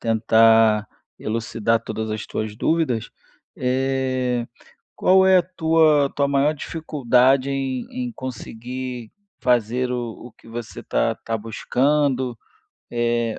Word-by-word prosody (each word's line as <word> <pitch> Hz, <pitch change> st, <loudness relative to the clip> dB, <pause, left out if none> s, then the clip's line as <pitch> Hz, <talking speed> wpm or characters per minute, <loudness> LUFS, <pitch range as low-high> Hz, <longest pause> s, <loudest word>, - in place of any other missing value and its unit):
tentar 110 Hz, -1 st, +4 dB, 0.3 s
elucidar 115 Hz, 0 st, -1 dB
todas 110 Hz, 0 st, -4 dB
as 110 Hz, 0 st, -4 dB
tuas 110 Hz, -1 st, -4 dB
dúvidas. 130 Hz, -7 st, 0 dB, 0.5 s
É, 130 Hz, -1 st, 0 dB, 0.5 s
qual 190 Hz, +1 st, +4 dB
é 190 Hz, 0 st, +6 dB
a -, -, +5 dB
tua 160 Hz, -5 st, +2 dB
tua 140 Hz, -1 st, +1 dB
maior 140 Hz, +2 st, +2 dB
dificuldade 135 Hz, -4 st, +1 dB
em 135 Hz, -2 st, -2 dB
em 250 Hz, -1 st, -4 dB
conseguir 125 Hz, -, -6 dB, 0.3 s
fazer 125 Hz, +1 st, +1 dB
o 120 Hz, -2 st, -5 dB
o 125 Hz, -, -16 dB
que -, -, -21 dB
você 115 Hz, 0 st, -7 dB
está -, -, 0 dB
está 115 Hz, 0 st, -4 dB
buscando? 130 Hz, +3 st, 0 dB, 0.5 s
É, 120 Hz, -1 st, 0 dB
125 Hz, 115 wpm, -22 LUFS, 115-140 Hz, 0.5 s, é